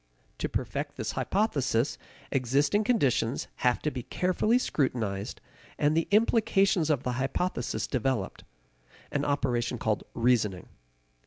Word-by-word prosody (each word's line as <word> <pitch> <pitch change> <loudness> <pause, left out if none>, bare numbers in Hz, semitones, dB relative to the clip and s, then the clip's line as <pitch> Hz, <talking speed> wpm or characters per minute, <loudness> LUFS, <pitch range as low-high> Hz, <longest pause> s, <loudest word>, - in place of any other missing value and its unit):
To - - -1
perfect - - -3
this - - -3
hypothesis, 145 - 0 0.3
existing 140 - +2
conditions 140 - +1
have 125 -1 +2
to 150 - 0
be 130 - -4
carefully 185 - +1
scrutinized 110 - -1 0.4
and 150 +1 +2
the 165 - +1
implications 205 -5 +3
of 145 -4 +1
the 125 - -1
hypothesis 180 +7 -1
developed 130 -6 -2 0.7
an 145 - 0
operation 125 -4 0
called 110 -2 -1
reasoning. 115 -6 +1
140 Hz, 115 wpm, -28 LUFS, 120-180 Hz, 0.7 s, implications